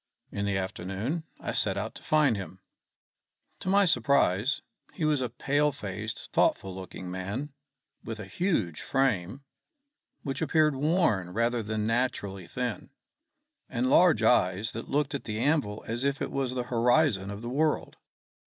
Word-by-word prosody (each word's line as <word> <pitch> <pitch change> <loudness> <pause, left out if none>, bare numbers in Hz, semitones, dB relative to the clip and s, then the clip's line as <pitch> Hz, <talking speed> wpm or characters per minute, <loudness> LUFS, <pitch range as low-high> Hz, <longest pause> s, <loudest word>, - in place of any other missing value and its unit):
In 100 0 -2
the 100 -1 0
afternoon 95 - -3
I - - -4
set - - 0
out - - -3
to - - -12
find 150 -6 +3
him. 95 -1 -7 1.0
To - - -4
my 200 +1 +5
surprise, 125 - +2 0.3
he 165 - -1
was 150 -3 +2
a 125 - -1
pale 145 +5 +1
faced, 110 -4 -6
thoughtful 95 -1 +2
looking 95 -1 -7
man, 100 +11 -4 0.5
with 115 -1 -6
a 105 - -6
huge 95 - -1
frame, 135 -2 0 0.8
which 135 +1 -3
appeared 155 -1 +3
worn 145 - +2
rather 115 +2 +1
than 110 0 -2
naturally 110 -6 -1
thin, 125 +3 -3 0.8
and 125 +2 0
large 170 -12 +5
eyes 105 -2 +3
that 115 - -7
looked 145 0 0
at 140 - -4
the 110 -2 -3
anvil 130 -6 0
as 115 +3 -2
if 140 0 0
it - - -3
was 130 -2 -1
the 125 - -1
horizon 120 -4 +3
of 100 +2 -6
the - - -4
world. 150 +4 0
120 Hz, 155 wpm, -28 LUFS, 100-145 Hz, 1.0 s, my